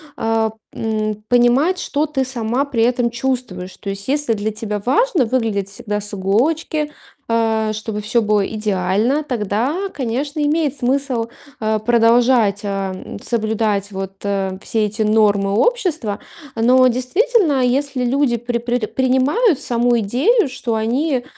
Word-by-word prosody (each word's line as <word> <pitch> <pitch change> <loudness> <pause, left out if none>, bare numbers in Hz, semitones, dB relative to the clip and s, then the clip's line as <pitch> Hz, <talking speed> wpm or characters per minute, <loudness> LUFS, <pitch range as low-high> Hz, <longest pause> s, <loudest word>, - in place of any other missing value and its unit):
а, 225 -1 0 0.2
м, 215 -1 -2
понимать, 245 +9 +3
что 295 -2 -1
ты 290 -3 -1
сама 245 0 -1
при 265 -6 0
этом 245 0 +2
чувствуешь. 235 -7 -3
То 200 - -7
есть 195 +1 -5
если 290 -2 0
для 215 0 -1
тебя 210 -1 -4
важно 345 - +2
выглядеть 225 -5 -1
всегда 205 +1 -4
с 210 +1 -1
иголочки, 295 +10 0 0.4
э, 220 -1 +1
чтобы 215 0 -4
всё 230 +3 +1
было 210 -2 +2
идеально, 210 +6 0
тогда, 250 - -1
конечно, 280 +4 -3
имеет 295 -1 +1
смысл, 255 -2 0 0.3
э, 215 0 +1
продолжать, 230 -1 +3
э, - - -3
м, 195 0 -4
соблюдать 215 -3 -1
вот, 195 0 -5
э, 195 -2 -2
все 220 0 0
эти 210 +2 -3
нормы 210 -2 +3
общества. 310 - 0 0.4
Но 250 +3 +4
действительно, 295 - +2
если 265 +1 0
люди 255 0 +1
при 240 +1 -2
при 240 -1 -1
принимают 265 - +2
саму 240 -2 +2
идею, 275 - +2
что 250 -3 -3
они, 250 +5 0
235 Hz, 140 wpm, -19 LUFS, 215-265 Hz, 0.4 s, Но